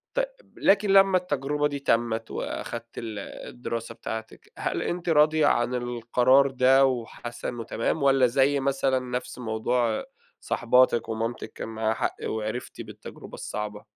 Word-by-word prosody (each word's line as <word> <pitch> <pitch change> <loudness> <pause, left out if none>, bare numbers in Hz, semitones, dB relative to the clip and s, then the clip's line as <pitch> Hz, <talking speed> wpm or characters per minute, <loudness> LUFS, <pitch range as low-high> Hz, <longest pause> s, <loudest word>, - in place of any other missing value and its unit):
ت - - 0 0.3
لكن 200 0 +3
لمّا 195 -1 +6
التجربة 150 -3 -1
دي 140 -1 -4
تمِّت، 115 -3 0
وأخدتِ 115 0 -5
ال 110 -3 -5 0.3
الدراسة 115 -1 -5
بتاعتِك، 110 0 -7
هل - - -2
أنتِ 175 0 -3
راضية 155 0 +4
عن 120 +1 +2
القرار 125 +3 +3
ده 135 +1 +5
وحاسّة 120 -1 -3
إنّه 120 -2 -5
تمام؟ 130 +7 -1
والّا 135 -2 +5
زي 135 +3 +2
مثلًا 135 -1 +1
نفس 125 0 -5
موضوع 115 0 0 0.3
صاحباتِك، 125 -1 +2
ومامتِك 115 +2 -3
كان - - -6
معاها 110 0 -1
حق - - -2
وعرفتِ 110 +2 -4
بالتجربة - - -11
الصعبة؟ 105 0 -5
125 Hz, 140 wpm, -26 LUFS, 115-140 Hz, 0.3 s, لمّا